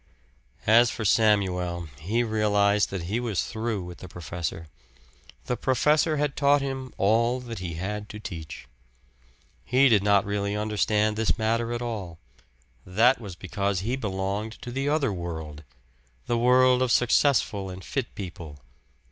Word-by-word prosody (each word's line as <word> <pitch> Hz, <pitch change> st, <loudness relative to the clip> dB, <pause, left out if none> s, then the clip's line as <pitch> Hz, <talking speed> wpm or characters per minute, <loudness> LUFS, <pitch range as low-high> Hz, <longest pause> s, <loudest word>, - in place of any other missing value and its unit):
As 115 Hz, +2 st, +6 dB
for 115 Hz, -, -4 dB
Samuel, 90 Hz, -5 st, +2 dB
he 110 Hz, +9 st, 0 dB
realized 105 Hz, -2 st, +2 dB
that 95 Hz, -3 st, -4 dB
he 100 Hz, +7 st, -2 dB
was 115 Hz, -6 st, -1 dB
through 110 Hz, -3 st, -3 dB
with 90 Hz, 0 st, -9 dB
the 95 Hz, -, -9 dB
professor. 85 Hz, -1 st, -5 dB, 0.8 s
The 125 Hz, -, -1 dB
professor 150 Hz, +5 st, +2 dB
had 145 Hz, -1 st, -1 dB
taught 145 Hz, 0 st, +4 dB
him 135 Hz, -2 st, -4 dB
all 115 Hz, +5 st, +2 dB
that 115 Hz, -3 st, -7 dB
he 85 Hz, -2 st, -5 dB
had 105 Hz, +4 st, -4 dB
to 105 Hz, -, -8 dB
teach. 85 Hz, -9 st, -8 dB, 1.0 s
He 130 Hz, +2 st, +4 dB
did 105 Hz, -4 st, +4 dB
not 100 Hz, -1 st, +3 dB
really 100 Hz, 0 st, -2 dB
understand 105 Hz, 0 st, 0 dB
this 110 Hz, 0 st, +1 dB
matter 115 Hz, +1 st, 0 dB
at 120 Hz, 0 st, -3 dB
all 100 Hz, -8 st, -5 dB, 0.7 s
that 120 Hz, +8 st, +3 dB
was 100 Hz, -5 st, -8 dB
because 100 Hz, 0 st, -2 dB
he 120 Hz, +6 st, -1 dB
belonged 100 Hz, -1 st, -3 dB
to 125 Hz, -, -6 dB
the 135 Hz, +3 st, -1 dB
other 145 Hz, -7 st, +1 dB
world, 80 Hz, -4 st, -6 dB, 0.6 s
the 120 Hz, -, 0 dB
world 125 Hz, +1 st, +4 dB
of 130 Hz, -2 st, +1 dB
successful 120 Hz, -6 st, +2 dB
and 95 Hz, 0 st, -9 dB
fit 135 Hz, -3 st, -3 dB
people. 85 Hz, -6 st, -8 dB
105 Hz, 150 wpm, -26 LUFS, 95-120 Hz, 1.0 s, As